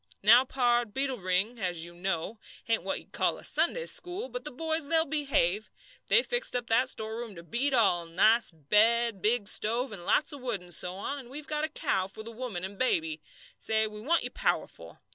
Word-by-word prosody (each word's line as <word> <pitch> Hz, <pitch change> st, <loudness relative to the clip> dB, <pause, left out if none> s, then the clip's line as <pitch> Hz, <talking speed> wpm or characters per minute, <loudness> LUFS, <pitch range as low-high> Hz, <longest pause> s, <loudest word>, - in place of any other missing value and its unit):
Now, 235 Hz, +5 st, +7 dB
pard, 240 Hz, -4 st, +1 dB
Beetle 265 Hz, -2 st, 0 dB
Ring, 190 Hz, +6 st, 0 dB
as 175 Hz, -4 st, 0 dB
you 175 Hz, -, -12 dB
know, 190 Hz, +4 st, -3 dB, 0.3 s
ain't 230 Hz, -1 st, +1 dB
what 195 Hz, +2 st, -3 dB
you'd -, -, -14 dB
call -, -, 0 dB
a -, -, -11 dB
Sunday -, -, 0 dB
school, 380 Hz, +5 st, -3 dB
but -, -, -6 dB
the 300 Hz, -, -2 dB
boys 320 Hz, +2 st, -2 dB
they'll 325 Hz, +1 st, +4 dB
behave. 270 Hz, -, 0 dB, 0.4 s
They 485 Hz, -, +5 dB
fixed 485 Hz, -, -1 dB
up 245 Hz, -1 st, -1 dB
that 250 Hz, +3 st, +3 dB
storeroom 220 Hz, -2 st, -5 dB
to 170 Hz, -, -10 dB
beat 260 Hz, +9 st, +1 dB
all, 175 Hz, -8 st, +3 dB
nice 215 Hz, +8 st, +4 dB
bed, 210 Hz, +7 st, +2 dB
big 215 Hz, 0 st, +3 dB
stove, 235 Hz, +6 st, 0 dB
and 195 Hz, -4 st, -6 dB
lots 290 Hz, -, +1 dB
of 285 Hz, -, -8 dB
wood, 240 Hz, -7 st, -2 dB
and 175 Hz, -1 st, -6 dB
so 180 Hz, +2 st, -2 dB
on, 280 Hz, +9 st, -4 dB
and 250 Hz, -3 st, -12 dB
we've 290 Hz, +3 st, -8 dB
got 300 Hz, 0 st, -1 dB
a -, -, -6 dB
cow 190 Hz, -11 st, -1 dB
for 220 Hz, +3 st, -9 dB
the 230 Hz, -, -8 dB
woman 225 Hz, -6 st, -5 dB
and 195 Hz, +1 st, -6 dB
baby. 160 Hz, -11 st, 0 dB, 0.4 s
Say, 220 Hz, 0 st, +2 dB
we 210 Hz, 0 st, -8 dB
want 330 Hz, +9 st, +1 dB
you -, -, -4 dB
powerful. -, -, -3 dB
230 Hz, 210 wpm, -29 LUFS, 190-265 Hz, 0.4 s, Now